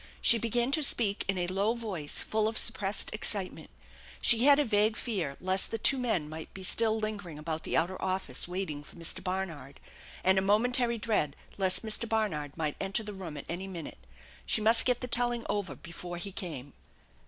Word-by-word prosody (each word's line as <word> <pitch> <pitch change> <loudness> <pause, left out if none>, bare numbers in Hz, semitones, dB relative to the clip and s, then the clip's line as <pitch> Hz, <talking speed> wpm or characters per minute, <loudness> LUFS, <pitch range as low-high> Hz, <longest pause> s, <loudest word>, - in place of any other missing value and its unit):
She 230 - +5
began 240 +3 +1
to 310 - +3
speak 220 -7 +3
in 195 -1 +1
a 175 - 0
low 195 +5 0
voice 190 -11 -3
full 215 0 0
of 220 0 -3
suppressed 210 -4 +1
excitement. 205 -3 -4 0.5
She 235 +1 +5
had 285 -1 +9
a 295 - +3
vague 215 -1 +3
fear 180 - -3
lest 185 +1 +1
the 225 - -3
two 265 +4 +2
men 220 -11 0
might 155 +1 -8
be 190 - -8
still 220 +3 +3
lingering 200 -7 -5
about 155 +1 -4
the - - -1
outer 175 +3 0
office, 185 -9 -1
waiting 180 -5 -4
for 145 - -14
Mr. 170 -1 -3
Barnard, 180 -7 -4 0.4
and 190 +1 +4
a - - 0
momentary 235 +4 +2
dread 210 -10 0 0.2
lest 190 +3 +4
Mr. 220 +1 0
Barnard 165 -11 -1
might 155 -3 -2
enter 195 +3 -1
the 210 0 -7
room 175 -6 -7
at - - -8
any 180 +3 -5
minute. 170 - -8 0.4
She - - 0
must 225 +2 +4
get 250 -1 +1
the 250 - -3
telling 240 -1 +2
over 205 -2 -2
before 175 0 -8
he 195 +3 -6
came. 145 -8 -6
195 Hz, 195 wpm, -30 LUFS, 175-225 Hz, 0.5 s, had